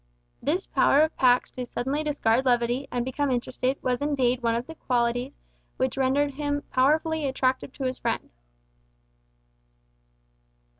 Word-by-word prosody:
This - - 0
power 165 - +3
of 315 - -1
Pax 250 -1 +3
to 255 - -5
suddenly 275 +6 -2
discard 260 -5 +1
levity, 245 +1 +1
and 245 -1 -1
become 275 +2 -1
interested, 255 +1 -1
was 250 0 0
indeed 260 -4 +1
one 230 -1 +1
of 235 +1 -2
the 325 - -9
qualities 245 -1 -1 0.4
which 260 -1 0
rendered 270 +2 +1
him 290 +1 -2
powerfully 310 +3 +2
attractive 260 0 0
to 275 - -6
his 255 0 -2
friend. - - -2
260 Hz, 140 wpm, -26 LUFS, 245-285 Hz, 0.4 s, power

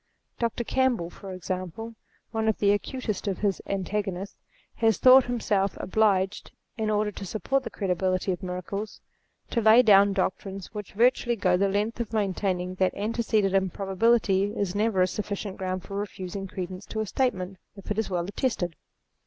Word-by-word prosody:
Dr. 235 0 -1
Campbell, 245 -9 +1
for 195 - -9
example, 185 +4 -5 0.4
one 220 -1 -1
of 220 - +2
the 200 -1 +3
acutest 215 -1 -2
of 195 -3 -1
his 200 -3 0
antagonists, 195 0 -3 0.4
has 225 -2 +3
thought 260 0 +8
himself 205 -5 0
obliged, 195 -1 +1 0.3
in 220 -2 -1
order 210 0 +1
to 200 - -8
support 225 +8 -1
the 240 - -6
credibility 185 -1 0
of 180 - -3
miracles, 185 +3 -5 0.5
to 235 - +1
lay 220 +3 +7
down 200 -2 +6
doctrines 195 0 -3
which 210 -2 -7
virtually 240 +2 +3
go 185 -4 +2
the 195 +2 +2
length 210 +4 -1
of 230 -1 -4
maintaining 190 -3 -1
that 185 -1 +2
antecedent 210 -2 0
im 190 -1 +2
probability 195 +1 +2
is 195 -3 -1
never 205 -2 +2
a - - +2
sufficient 200 0 -4
ground 185 -1 -3
for 195 - -8
refusing 195 -1 -5
credence 185 +1 -6
to 220 - -4
a - - -1
statement, 195 -5 -1 0.2
if 195 0 -9
it 210 - 0
is 220 - -1
well 175 -2 -1
attested. 195 -5 -2
200 Hz, 170 wpm, -27 LUFS, 185-220 Hz, 0.5 s, thought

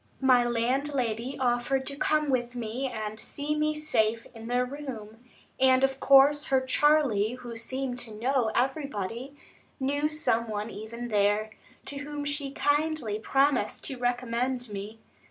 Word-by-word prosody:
My 255 -2 +5
landlady 245 0 -1
offered 255 +1 +1
to 280 - -4
come 300 0 +1
with 245 -1 -1
me 240 +3 -3
and 215 -3 -5
see 295 +5 -3
me 305 0 +1
safe 230 -7 +1
in 225 -1 -9
the 245 +1 +1
room; 245 -5 -8 0.4
and 260 0 +5
of 270 0 +1
course 275 +2 +6
her 265 -1 +3
Charley, 260 -5 +3
who 245 -2 -8
seemed 250 +2 -3
to 225 -3 -6
know 245 +1 +1
everybody, 260 -1 -2 0.4
knew 285 +3 0
some 235 -7 0
one 210 +1 -3
even 230 +3 -7
there, 210 +1 +2 0.3
to 280 - -4
whom 290 0 -5
she 285 -1 -1
kindly 290 -6 0
promised 275 +3 +1
to 265 - -5
recommend 245 0 -1
me. 205 +2 -6
255 Hz, 145 wpm, -28 LUFS, 230-280 Hz, 0.4 s, course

